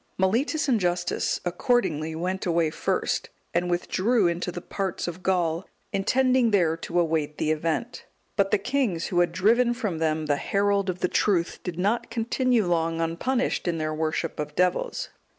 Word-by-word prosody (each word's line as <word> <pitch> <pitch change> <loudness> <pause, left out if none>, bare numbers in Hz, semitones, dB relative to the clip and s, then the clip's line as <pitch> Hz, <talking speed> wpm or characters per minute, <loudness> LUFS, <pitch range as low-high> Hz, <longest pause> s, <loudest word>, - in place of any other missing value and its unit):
Mellitus 240 - +1
and 245 -5 +3
Justus 175 -1 0
accordingly 175 - 0
went 185 +3 -2
away 165 -2 +2
first, - - -1 0.2
and 175 +1 +1
withdrew 190 +5 +1
into 170 +1 -1
the 175 - -5
parts 190 +1 -3
of 175 +1 -5
Gaul, 175 -2 0 0.3
intending 255 +4 +3
there 175 -6 +3
to 170 +1 -1
await 155 -3 0
the 155 - 0
event. 165 +10 -2 0.3
But 200 -2 +2
the - - +3
kings, 205 -5 -1
who 175 - +1
had 175 -1 +3
driven 235 +7 +3
from 210 -10 -2
them 155 -1 0
the 145 -1 +1
herald 200 +3 +1
of 180 0 -3
the - - +3
truth, 180 -3 +1
did 180 -3 -5
not 205 +6 0
continue 235 0 +1
long 165 -1 0
unpunished 175 +10 -1
in 170 -1 0
their 155 -1 -2
worship 155 +1 -2
of 150 0 -4
devils. 180 - 0
180 Hz, 170 wpm, -26 LUFS, 165-215 Hz, 0.3 s, and